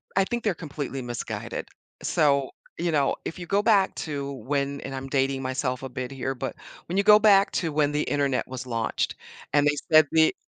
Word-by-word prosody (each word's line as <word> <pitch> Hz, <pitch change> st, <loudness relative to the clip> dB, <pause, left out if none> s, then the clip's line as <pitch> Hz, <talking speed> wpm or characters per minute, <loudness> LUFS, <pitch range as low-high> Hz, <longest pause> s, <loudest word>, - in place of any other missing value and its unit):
I 195 Hz, -, +4 dB
think 240 Hz, +3 st, -3 dB
they're 205 Hz, -4 st, +1 dB
completely 140 Hz, -4 st, -5 dB
misguided. 120 Hz, -1 st, -5 dB, 0.3 s
So, 140 Hz, -3 st, +2 dB, 0.3 s
you 170 Hz, 0 st, 0 dB
know, 145 Hz, -3 st, +2 dB
if 170 Hz, -, -5 dB
you 175 Hz, -, -6 dB
go 200 Hz, +4 st, +2 dB
back 205 Hz, -3 st, +3 dB
to 140 Hz, -3 st, -4 dB
when 140 Hz, +3 st, -2 dB
and 135 Hz, -, -6 dB
I'm 135 Hz, 0 st, -5 dB
dating 135 Hz, -1 st, +1 dB
myself 130 Hz, 0 st, -2 dB
a 130 Hz, -, -5 dB
bit 125 Hz, +1 st, -5 dB
here, 135 Hz, 0 st, -3 dB
but 135 Hz, +1 st, -4 dB, 0.3 s
when 180 Hz, -, -2 dB
you 200 Hz, -, +3 dB
go 210 Hz, 0 st, +8 dB
back 200 Hz, -2 st, +5 dB
to 165 Hz, -4 st, -1 dB
when 145 Hz, -1 st, +2 dB
the 150 Hz, 0 st, 0 dB
internet 140 Hz, -3 st, 0 dB
was 130 Hz, 0 st, -6 dB
launched 115 Hz, -2 st, -1 dB, 0.4 s
and 145 Hz, 0 st, +4 dB
they 145 Hz, -, +3 dB, 0.2 s
said 155 Hz, -1 st, +7 dB
the 160 Hz, -1 st, +4 dB
145 Hz, 205 wpm, -26 LUFS, 135-165 Hz, 0.4 s, go